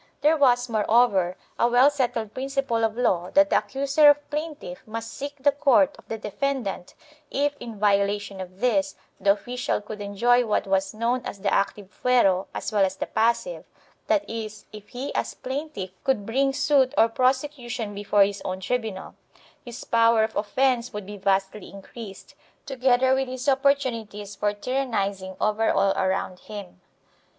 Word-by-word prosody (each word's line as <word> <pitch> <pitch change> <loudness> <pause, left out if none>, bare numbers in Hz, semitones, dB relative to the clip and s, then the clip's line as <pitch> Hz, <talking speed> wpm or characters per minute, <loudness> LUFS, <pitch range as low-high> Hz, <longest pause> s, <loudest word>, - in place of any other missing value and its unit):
There 305 +2 +4
was, 250 -4 +3
more 220 -3 -1
over, 195 -6 +3 0.2
a 235 - +4
well 250 +4 +5
settled 240 -6 -2
principle 270 -3 -1
of 225 0 0
law 180 -8 +1
that 295 0 +5
the - - +5
accuser 280 +2 +3
or - - +9
plaintiff 295 - -6
must 225 +1 -6
seek 285 +1 -6
the 285 +1 +3
court 280 0 +3
of - - -18
the 225 - -4
defendant; 220 -4 -3 0.3
if, 285 +1 0
in 230 -3 -8
violation 200 -1 +1
of 185 +2 -10
this, 195 -6 +1 0.2
the 200 - +4
official 245 +3 -3
could 210 0 -8
enjoy 235 +5 +2
what 220 -3 0
was 195 +1 0
known 235 +3 0
as - - -6
the 200 - 0
active 200 0 -1
fuero 195 -7 +3
as - - -5
well 205 -2 +3
as 190 0 0
the - - -3
passive 235 - 0 0.2
— - - -36
that 305 - +1
is, 215 -2 -6
if 210 -1 -11
he 260 +3 -5
as - - -2
plaintiff 260 -8 -5
could 225 -7 0
bring 270 +5 +1
suit 275 -2 +2
or 225 - +6
pros 255 +3 +2
ecution 245 -7 -6
before 205 0 +3
his 200 0 -2
own 185 0 -4
tribunal 215 -1 -3 0.3
— - - -29
his 240 0 -8
power 230 -1 +4
of 220 0 -3
offence 245 +3 +1
would 210 -3 -6
be 205 +2 -8
vastly 195 +1 -1
increased, 200 +1 -11 0.3
together 260 -1 +2
with 265 0 0
his 255 +2 -6
opportunities 245 -7 0
for 205 +1 0
tyrannizing 205 -5 -2
over 215 +1 +1
all 195 0 +3
around 190 -1 -1
him. 205 - -10
230 Hz, 175 wpm, -25 LUFS, 200-260 Hz, 0.3 s, or